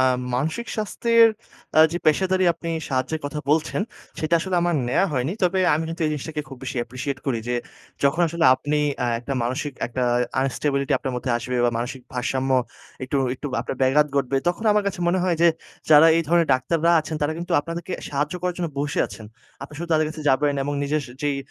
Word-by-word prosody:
আ - - +5 0.3
মানসিক 160 - -2
স্বাস্থ্যের 230 +2 +4 0.5
আ - - +7
যে 175 - -1
পেশাদারী 185 +4 +3
আপনি 165 0 -6 0.2
সাহায্যের 135 +4 -1
কথা 145 +1 -5
বলছেন, 155 +4 +1 0.4
সেটা 155 +2 +1
আসলে 185 +1 -1
আমার 175 0 +1
নেওয়া 135 +10 +2
হয়নি। 135 +3 -1
তবে 185 +1 +2 0.2
আমি 160 +2 -1
কিন্তু 165 +1 -4
এই - - 0
জিনিসটাকে 150 +1 -4
খুব 135 - -9
বেশি 135 +1 -5
appreciate 130 +3 -5
করি। 125 -4 0
যে 125 - 0 0.5
যখন 140 +5 +2
আসলে 170 +1 -1
আপনি 145 +3 -1 0.3
আ - - 0
একটা 130 +3 -5
মানসিক 130 +4 -2
একটা 125 +1 -3 0.4
unstability 140 +1 0
আপনার 130 - -4
মধ্যে 125 +1 -3
আসবে। 125 +1 -3
বা 120 - +3
মানসিক 125 +2 -4
ভারসাম্য 130 +1 -1 0.5
একটু 130 +2 -2 0.2
একটু 140 - -7
আপনার 130 - -5
ব্যাঘাত 140 +3 +4
ঘটবে। 135 -1 +1
তখন 180 +6 -2
আমার 210 0 +2
কাছে 195 -2 -2
মনে 180 +2 +2
হয় 175 -2 +1
যে, 170 - +7 0.4
যারা 155 +1 +9
এই 165 - +2
ধরনের 170 0 +4
ডাক্তাররা 165 +6 +1
আছেন 155 0 -5
তারা 145 +1 +1
কিন্তু 170 - -5
আপনাদেরকে 170 +3 -6 0.2
সাহায্য 145 +3 -2
করার 180 -1 -1
জন্য 175 -2 -1
বসে 145 +1 -2
আছেন। 110 - -10 0.4
আপনি 140 - -9
শুধু 170 +1 -5
তাদের 155 0 +3
কাছে 155 0 -7
যাবেন। 145 +2 +2
এবং 145 +1 -2
নিজের 150 +2 0
স - - -14
যেই 145 -1 0
150 Hz, 200 wpm, -23 LUFS, 135-170 Hz, 0.5 s, যারা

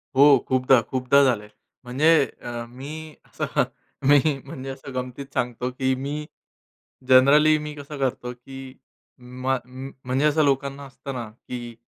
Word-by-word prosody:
हो, 140 - +7 0.2
खूपदा, 130 -1 +4
खूपदा 130 +2 +4
झालंय. 105 -5 +1 0.3
म्हणजे 135 +6 +2 0.3
अ, 120 -1 -5
मी 150 +5 -8
असं - - -4 0.6
मी 145 -1 +8 0.3
म्हणजे 135 -1 -7
असं 135 0 -8
गमतीत 130 +2 -5
सांगतो, 125 0 -1
की 130 +1 0
मी 145 +3 -4 0.8
जनरली 150 +4 +6
मी 150 0 -6
कसं 145 0 -8
करतो, 130 -2 -2
की 130 +1 -11 0.7
मग 130 -1 +1
म 130 +2 -8 0.2
म्हणजे 130 +4 +1
असं 155 +1 +3
लोकांना 140 0 -1
असतं 135 +1 -8
ना, 120 -3 -5
की 120 0 -8
135 Hz, 140 wpm, -24 LUFS, 125-140 Hz, 0.8 s, मी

